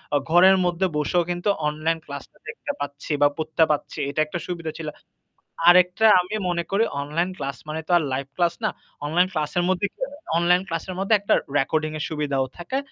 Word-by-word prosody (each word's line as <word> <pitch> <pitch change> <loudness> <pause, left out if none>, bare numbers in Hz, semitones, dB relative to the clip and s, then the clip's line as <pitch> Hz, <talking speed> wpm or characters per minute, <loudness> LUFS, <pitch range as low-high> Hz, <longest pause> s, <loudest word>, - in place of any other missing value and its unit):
অ - - +6
ঘরের 185 +3 +7
মধ্যে 175 +2 +1
বসেও 170 +4 +1
কিন্তু 175 +3 -1 0.2
অনলাইন 155 +2 0
ক্লাসটা 140 -1 -9
দেখতে - - -5
পাচ্ছি 145 +1 -5
বা 145 - +7
পড়তে 160 +1 +1
পাচ্ছি। 150 - -2
এটা 140 - -3
একটা 155 +3 -5
সুবিধা 165 -3 -4
ছিল। 165 -2 -6 0.8
আরেকটা 180 +4 +6
আমি 180 +4 -5
মনে 170 -1 -1
করি 200 +3 +3 0.2
অনলাইন 160 +6 -1
ক্লাস 135 -4 -4
মানে 155 +1 -3
তো - - -9
আর 170 - +3
লাইভ 135 +1 -2
ক্লাস 175 -1 +2
না। - - +2 0.4
অনলাইন 175 +5 +2
ক্লাসের 155 +1 -1
মধ্যে 185 +2 +1
কি - - -46 0.4
অনলাইন 175 +2 +3
ক্লাসের 165 +2 -4
মধ্যে 195 +3 +2
একটা 200 - +2 0.2
রেকর্ডিং 155 +3 0
এর 150 - -3
সুবিধাও 145 -4 -1
থাকে। 175 +10 -3
170 Hz, 185 wpm, -24 LUFS, 150-180 Hz, 0.8 s, ঘরের